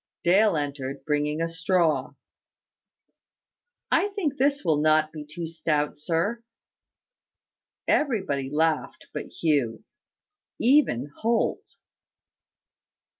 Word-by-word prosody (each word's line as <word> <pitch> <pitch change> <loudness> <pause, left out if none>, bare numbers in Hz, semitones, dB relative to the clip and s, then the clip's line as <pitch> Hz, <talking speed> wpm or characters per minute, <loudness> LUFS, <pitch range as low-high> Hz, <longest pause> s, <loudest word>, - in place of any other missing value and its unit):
Dale 195 +1 +4
entered, 140 -2 -4
bringing 150 +1 0
a - - 0
straw. 165 -5 0 1.8
"I - - +4
think 315 -9 -1
this 280 -3 +1
will 155 -3 +2
not 155 0 +3
be 155 -2 -6
too 165 +3 -6
stout, 155 -2 -1
sir." 175 +9 -1 1.5
Everybody 190 - +1
laughed 160 +1 0
but - - -5
Hugh 140 -9 0 0.7
even 230 - +3
Holt. 230 0 -1
160 Hz, 90 wpm, -26 LUFS, 150-195 Hz, 1.8 s, Dale